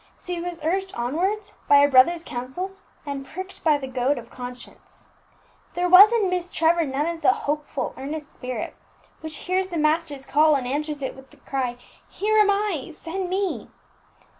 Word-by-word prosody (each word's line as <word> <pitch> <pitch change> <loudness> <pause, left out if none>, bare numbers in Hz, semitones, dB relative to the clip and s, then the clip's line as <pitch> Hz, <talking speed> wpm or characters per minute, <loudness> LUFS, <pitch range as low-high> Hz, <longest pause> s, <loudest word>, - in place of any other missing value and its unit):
She 355 -1 -5
was 350 -1 -5
urged 380 +4 -1
onwards 375 - -2
by 285 - +7
a - - +6
brother's 290 +6 +5
counsels, 355 +12 -6 0.2
and 280 -1 -4
pricked 375 +7 -9
by 305 -3 +4
the 275 - -6
goad 260 +2 0
of 235 -1 -9
conscience. 245 0 -11 0.7
There 355 0 +1
was 380 +4 +9
in 455 -4 +2
Miss 360 -1 -1
Trevor 335 0 +2
none 275 +3 -1
of 335 -1 -3
the - - +4 0.2
hopeful, 295 -1 -2
earnest 295 +2 -6
spirit 250 -1 -5 0.4
which 315 -1 -7
hears 375 +1 0
the 345 - -3
Master's 305 -2 0
call, 305 +1 +4
and 265 -3 -1
answers 290 +2 -3
it 265 - -3
with 265 0 -15
the 295 - -20
cry, 255 -2 -3 0.3
"Here 430 +2 +1
am 420 -1 +5
I; 400 -9 0
send 355 +4 -5
me!" 385 0 -2
315 Hz, 175 wpm, -24 LUFS, 275-365 Hz, 0.7 s, was